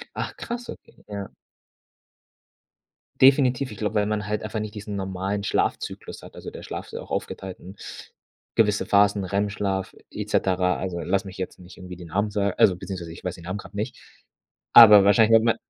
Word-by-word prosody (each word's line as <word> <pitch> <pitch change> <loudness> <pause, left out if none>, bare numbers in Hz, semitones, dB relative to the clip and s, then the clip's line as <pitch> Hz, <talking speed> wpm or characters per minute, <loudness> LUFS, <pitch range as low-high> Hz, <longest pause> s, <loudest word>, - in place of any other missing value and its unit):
Ach, - - -4
krass, 240 0 -6
okay, - - -12
ja. 100 -1 -6 1.9
Definitiv. 130 -1 +4
Ich 105 - -9
glaube, 105 +2 -2
weil 105 0 +2
man 105 -1 -2
halt 105 +1 -2
einfach 110 0 -4
nicht 105 0 -6
diesen 105 -1 -6
normalen 95 +1 -3
Schlafzyklus - - -2
hat, - - -13
also - - -8
der - - -10
Schlaf - - -6
ist - - -16
ja - - -5
auch - - -15
aufgeteilt 95 -1 -5
in 95 +3 -12 0.8
gewisse 105 -2 +2
Phasen, 100 -1 +3
REM-Schlaf 100 -1 -2 0.2
et - - -6
cetera, 90 -1 +1
also, 90 -2 -4
lass 95 +4 0
mich 95 -1 -9
jetzt 95 - -5
nicht 90 0 -14
irgendwie 90 -1 -9
den 90 -2 -11
Namen 105 +5 -1
sa 100 -1 0
also, 95 -3 +3
beziehungsweise 90 -3 -7
ich 85 - -12
weiß 90 -1 -3
den 85 - -13
Namen 95 +3 -4
grad 100 - -12
nicht. 105 +2 -4 0.8
Aber 105 -4 +10
wahrscheinlich 110 +3 +5
wenn 110 - +3
man 115 - +3
100 Hz, 190 wpm, -24 LUFS, 95-105 Hz, 1.9 s, Aber